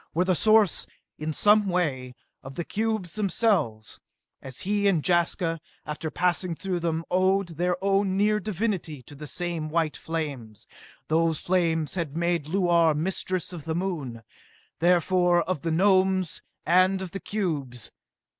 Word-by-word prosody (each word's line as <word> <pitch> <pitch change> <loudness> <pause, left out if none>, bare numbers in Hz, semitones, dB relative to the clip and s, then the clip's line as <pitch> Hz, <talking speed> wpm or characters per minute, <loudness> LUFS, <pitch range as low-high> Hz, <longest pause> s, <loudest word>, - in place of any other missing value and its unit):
were 180 +2 +2
the 185 - +3
source, 215 0 +3 0.3
in 155 +1 -2
some 210 +5 +4
way, 135 -9 -1 0.3
of 135 0 -10
the 170 - -3
cubes 220 -5 -2
themselves, 195 - 0 0.4
as 130 -1 -6
he 205 +1 +1
and 170 -7 +2
Jaska, 170 -2 +1 0.2
after 150 +1 -4
passing 180 +1 0
through 185 +1 -3
them, 165 -1 -2
owed 185 +1 +2
their 175 +2 -1
now 195 0 +3
near 205 +2 +1
divinity 190 - -3
to 135 - -13
the 150 +1 -9
same 170 -1 -3
white 160 -1 0
flames! 140 -10 -5 0.4
Those 165 0 +2
flames 165 -4 0
had 165 -4 -3
made 170 -3 0
Luar 170 -3 +3
mistress 185 +2 -2
of 160 -4 -8
the 160 -1 -2
Moon 150 -11 -3 0.6
therefore 175 0 +3
of 180 -5 -3
the 165 - -2
Gnomes 185 0 +2 0.2
and 185 +2 +4
of 180 - -7
the 195 - -5
cubes! 145 - -3
175 Hz, 145 wpm, -26 LUFS, 160-190 Hz, 0.6 s, some